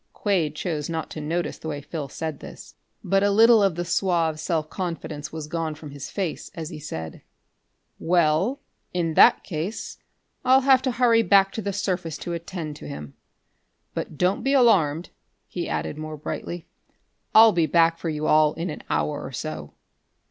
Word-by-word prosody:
Quade 175 -8 0
chose 150 -2 -3
not 165 -1 -4
to 155 - -6
notice 160 +1 -2
the - - -7
way 145 -2 -3
Phil 145 -1 -6
said 160 +1 -5
this, - - -11 0.3
but 195 0 +2
a 200 - +3
little 225 +2 +6
of 195 -4 +2
the 175 0 -3
suave 170 -4 +1
self 155 -1 -1
confidence 160 -4 -5
was 160 -1 -5
gone 160 0 -3
from 150 -1 -10
his 140 -1 -7
face 190 -6 -4
as 160 -3 -5
he 155 - -7
said: 80 - -7 0.8
"Well, 175 - +2 0.4
in 165 -2 0
that - - +6
case 180 +5 -5 0.4
I'll 260 +1 +5
have 265 -1 +5
to 260 -1 0
hurry 235 -2 +4
back 195 -3 +4
to 220 - -4
the 200 0 -2
surface 185 -5 -2
to 175 - -5
attend 170 -3 -5
to - - -10
him. 75 0 -8 0.8
But 150 - -5
don't 180 +5 +1
be 270 +4 +1
alarmed," 180 - +3 0.4
he 175 - -4
added, 150 - -3
more 155 0 -6
brightly. 165 +3 -5 0.7
"I'll 220 0 +9
be 170 -4 +2
back 165 0 +3
for 165 - -3
you 155 -1 -3
all 155 -1 +4
in 165 +1 -3
an - - -7
hour 150 -1 -1
or - - -7
so." 75 - -6
165 Hz, 180 wpm, -24 LUFS, 155-195 Hz, 0.8 s, I'll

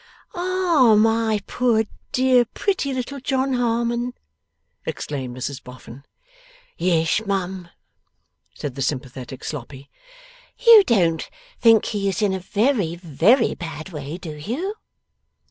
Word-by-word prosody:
'Ah, 350 -10 +3
my 225 -1 +2
poor 235 -3 +1 0.3
dear 255 -1 +4
pretty 335 - -2
little 260 +2 -4
John 265 0 0
Harmon!' 240 0 0 0.7
exclaimed 130 -4 -5
Mrs 130 +1 -5
Boffin. 125 +1 -12 0.7
'Yes 165 +2 +1
mum,' 190 -2 -3 0.9
said 145 - -5
the 135 - -6
sympathetic 130 -1 -4
Sloppy. 140 -1 -7 0.7
'You 465 -4 +8
don't 170 -8 +1 0.3
think 225 -2 +5
he 200 -2 -1
is 195 +2 -2
in 200 -2 +2
a 190 - -2
very, 200 - 0
very 175 - +3
bad 165 -1 -7
way, 150 -1 -6
do 165 -4 -7
you? 255 - -4
205 Hz, 115 wpm, -22 LUFS, 155-250 Hz, 0.9 s, You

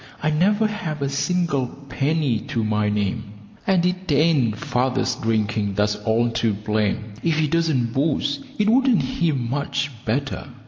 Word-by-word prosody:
I 155 - +2
never 205 +8 +3
have 165 -9 -3
a 140 - 0
single 140 -2 0 0.2
penny 140 -3 0
to 115 - -1
my 105 -1 +1
name, 105 0 -2 0.3
and 185 -2 +3
it 180 -1 -1
ain't 140 -7 +3
father's 125 +3 0
drinking 110 -3 -1
that's 105 +1 +2
all 110 +3 +1
to 115 -2 0
blame; 105 +1 -1
if 165 -2 +1
he 155 - +3
didn't 150 -7 +1
booze 140 0 0 0.2
it 210 - +2
wouldn't 255 0 +4
be 170 -2 +3
much 140 +2 -2
better. 135 +6 -2
135 Hz, 150 wpm, -22 LUFS, 110-160 Hz, 0.3 s, wouldn't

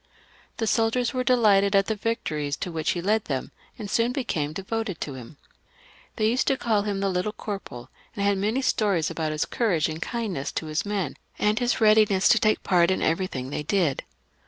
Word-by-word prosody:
The 225 - -1
soldiers 225 +2 +1
were 255 -1 0
delighted 210 -6 +4
at 195 0 +4
the 220 - -1
victories 155 -10 -2
to 180 - -4
which 160 -1 -1
he 175 - -4
led 215 +2 +1
them, 135 -3 -3 0.3
and 215 -4 -6
soon 230 +4 +1
became 165 - -2
devoted 195 +1 -4
to 145 - -4
him. 130 +3 -11 0.8
They 215 -2 +1
used 245 +4 +1
to 270 - +2
caU 220 -5 +1
him 200 -1 -2
the 200 - +1
Little 185 +3 -1
Corporal, 195 - -7 0.2
and 200 - -1
had 200 -1 +2
many 220 +7 0
stories 195 -10 +1
about 160 -2 -2
his 155 0 -1
courage 185 -10 +1
and 160 0 -6
kindness 210 - -3
to - - -3
his 155 +6 -2
men, 195 -9 -2 0.2
and 210 +1 +1
his 245 0 0
readiness 215 -3 +4
to 230 - +5
take 215 0 +2
part 175 -2 +3
in 190 - 0
everything 160 -6 -1
they - - -2
did. 160 -3 0
200 Hz, 200 wpm, -25 LUFS, 160-220 Hz, 0.8 s, to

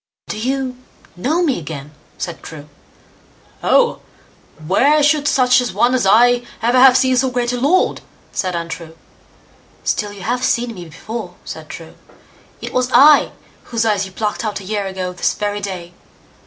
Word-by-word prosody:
"Do 215 - -4
you 260 +1 -2 0.4
know 300 - 0
me 280 - +1
again?" 150 -2 -8 0.3
said 170 -3 -5
True. 150 -2 -10 0.9
"Oh! - - +3 0.7
where 285 - +3
should 295 0 +3
such 250 -2 +4
a 245 - -3
one 245 +1 +2
as 245 -6 +1
I 240 +4 +5 0.2
ever 240 +2 +2
have 260 0 +7
seen 260 -1 +2
so 260 +1 +2
great 245 -1 -1
a 245 - -2
lord", 300 +9 +2 0.3
said 185 -3 -2
Untrue. 165 -1 -6 0.9
"Still 210 -1 -1
you 200 -2 -10
have 245 +2 -1
seen 235 -2 0
me 180 -4 -9
before", 220 +8 -7
said - - -8
True. - - -10 0.7
"It - - -6
was 250 0 +1
I 285 +4 +6 0.3
whose 230 -1 -1
eyes 205 -3 +1
you - - -13
plucked 210 +3 -3
out 210 -2 -3
a - - -11
year 205 0 -3
ago 185 -1 -4
this 180 - -1
very 205 0 -2
day. 180 -4 -6
230 Hz, 170 wpm, -18 LUFS, 190-255 Hz, 0.9 s, have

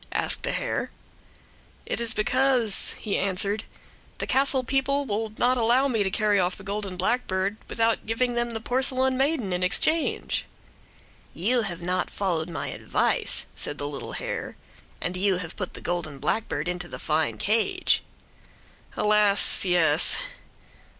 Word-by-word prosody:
asked - - +1
the - - -1
hare. - - -2 1.0
"It - - -2
is 230 -1 0
because," 250 -1 +3
he 205 - -2
answered, 200 +2 0 0.5
"the - - -3
castle 265 0 +3
people 275 +2 0
will 220 -1 -3
not 250 +1 +2
allow 240 +4 +3
me 230 -5 0
to 195 - +1
carry 205 +1 +1
off 180 0 0
the 195 - -12
golden 200 -2 -5
blackbird 190 -1 -1
without 230 -1 0
giving 245 +2 0
them 240 0 -1
the 225 -1 -3
porcelain 260 +2 +1
maiden 265 - 0
in 180 - -2
exchange." 310 - 0 0.9
"You 235 +8 +2
have 175 -5 -5
not 180 +1 -1
followed 175 -4 -2
my 165 - -4
advice," - - 0
said 145 - -2
the 145 - -3
little 145 -1 -6
hare. - - -4 0.4
"And 180 - -1
you 190 0 +1
have 175 -2 -6
put 185 - -5
the - - -9
golden 170 -5 -3
blackbird 160 +3 -2
into 180 -1 -2
the - - -7
fine 155 0 -1
cage." 220 +2 +2 1.0
"Alas! 210 -1 +4
yes!" 165 -3 +5
205 Hz, 150 wpm, -25 LUFS, 180-245 Hz, 1.0 s, yes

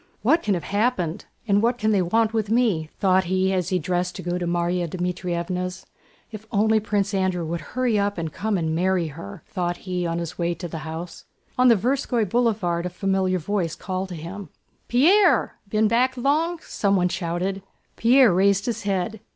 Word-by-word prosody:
"What 315 +9 +4
can 205 - +1
have 170 - -4
happened? 200 -4 -1 0.2
And 200 0 +3
what 235 +2 +1
can 220 -2 +1
they 200 -3 +3
want 220 +5 +1
with 215 -2 -1
me?" 215 -10 +1
thought 190 -1 +3
he 190 +2 +1
as 180 -3 -1
he 185 - +1
dressed 180 +1 -2
to 185 - -7
go 175 +1 -2
to 175 - -2
Márya 175 0 0
Dmítrievna's. 180 +1 -3 0.5
"If 215 0 -9
only 220 0 +3
Prince 205 -1 -1
Andrew 185 -3 0
would 165 +1 -3
hurry 240 - 0
up 200 0 0
and 160 -2 -4
come 215 -1 -1
and 160 -2 -1
marry 180 0 +1
her!" 165 +4 -10
thought 175 -3 -3
he 180 -2 -2
on 165 0 -2
his 170 0 -5
way 170 0 0
to 175 +1 -6
the 160 -1 -6
house. 165 +2 -7 0.3
On 255 0 +4
the 235 - +7
Tverskóy 240 0 0
Boulevard 190 -6 0
a - - -4
familiar 190 0 0
voice 180 -1 -2
called 190 0 -4
to 180 - -6
him. 180 +5 -8 0.4
"Pierre! 340 - +4
Been 215 +1 +2
back 250 +4 +2
long?" 310 +7 +1
someone 195 -3 +1
shouted. 180 +2 -2 0.3
Pierre 245 -2 +5
raised 195 +2 +3
his 230 -2 -2
head. 200 +1 -2
190 Hz, 190 wpm, -23 LUFS, 175-220 Hz, 0.5 s, the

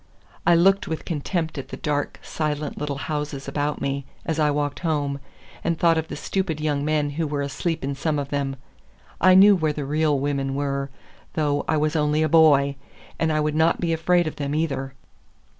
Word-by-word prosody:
I 175 - +7
looked 195 +3 +4
with 160 - -4
contempt 160 -1 -2
at 135 - -7
the - - -7
dark, 145 -1 -2
silent 150 -1 -3
little 145 -2 -3
houses 145 0 -4
about 145 +1 -2
me 140 0 -2 0.2
as 160 -1 -1
I 150 -1 +3
walked 145 -1 -1
home, 145 -4 -1 0.4
and 170 -1 0
thought 165 0 +4
of 160 - -4
the - - -6
stupid 185 -6 -2
young 150 -2 0
men 150 -1 0
who 160 +2 -2
were 145 -1 -2
asleep 160 +3 -2
in 140 +1 -1
some 150 +2 -1
of 140 -1 -3
them. 140 -1 -2 0.7
I 185 0 +7
knew 200 +2 +8
where 155 -4 0
the 145 -1 -4
real 150 +1 +1
women 135 -1 -1
were, 140 -1 -2 0.4
though 145 -2 0
I 155 - +2
was 155 +2 0
only 150 0 +2
a 155 - +1
boy; 140 -3 +5 0.4
and 160 -1 +1
I 155 - +1
would 150 0 0
not 160 +2 +2
be 170 -2 0
afraid 175 +2 +2
of 155 - -4
them, 145 0 -2
either! 135 -4 -2
150 Hz, 200 wpm, -24 LUFS, 140-160 Hz, 0.7 s, knew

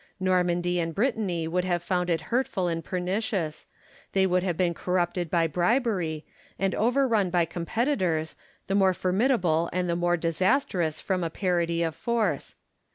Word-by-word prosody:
Normandy 180 -1 +1
and 165 -1 -2
Brittany 205 -8 0
would 180 +2 0
have 175 -2 -1
found 180 -1 0
it 165 -2 +1
hurtful 230 -7 0
and 165 -1 -2
pernicious: 180 0 -2 0.5
they 190 -1 +3
would 180 -1 +2
have 180 -3 -2
been 180 -2 +1
corrupted 175 0 -1
by 170 0 +2
bribery, 180 - 0 0.3
and 195 -1 0
overrun 235 -4 +2
by 175 -1 +2
competitors, 170 - -1 0.3
the 195 - -2
more 190 -2 +4
formidable 185 -4 +1
and 180 0 -1
the 170 - 0
more 175 0 +1
disastrous 170 - 0
from 185 -2 -1
a 165 - -1
parity 170 -1 0
of 165 -1 -1
force. 230 +7 -1
180 Hz, 155 wpm, -27 LUFS, 170-195 Hz, 0.5 s, more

